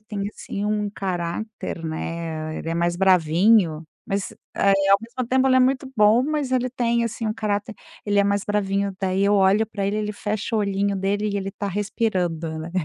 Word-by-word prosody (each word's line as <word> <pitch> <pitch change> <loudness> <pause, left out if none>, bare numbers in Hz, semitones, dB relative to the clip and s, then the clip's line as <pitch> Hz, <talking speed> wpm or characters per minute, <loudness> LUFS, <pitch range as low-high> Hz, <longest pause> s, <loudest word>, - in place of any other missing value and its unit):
tem, 205 -2 -4
assim, 205 -1 -6
um 210 -1 -1
caráter, 185 -1 -4
né, 160 0 -4
ele - - -6
é 165 - -1
mais 170 0 0
bravinho, 180 -1 +3 0.2
mas, 195 0 -2 0.2
eh, 200 - +3 0.2
ao 195 - +7
mesmo 240 +2 -5
tempo 260 +1 +3
ele 260 - +4
é - - +5
muito 260 +1 +1
bom, 215 +3 +5
mas 295 -3 -1
ele 255 0 +1
tem, 235 -1 +1
assim, 230 0 -3
um 215 - -1
caráter 215 0 -2 0.3
ele 205 -1 +1
é 200 - +4
mais 200 0 0
bravinho, 200 -1 -1
daí 190 0 +1
eu 205 - +3
olho 200 +2 +4
pra 200 -3 -3
ele 205 - -1
ele 210 0 -2
fecha 210 +2 -3
o - - +2
olhinho 200 0 0
dele, 200 +2 0
e 200 - -2
ele 195 0 -3
tá 200 - -4
respirando, 185 -6 -1
né. 160 +2 -6
200 Hz, 200 wpm, -23 LUFS, 190-220 Hz, 0.3 s, ao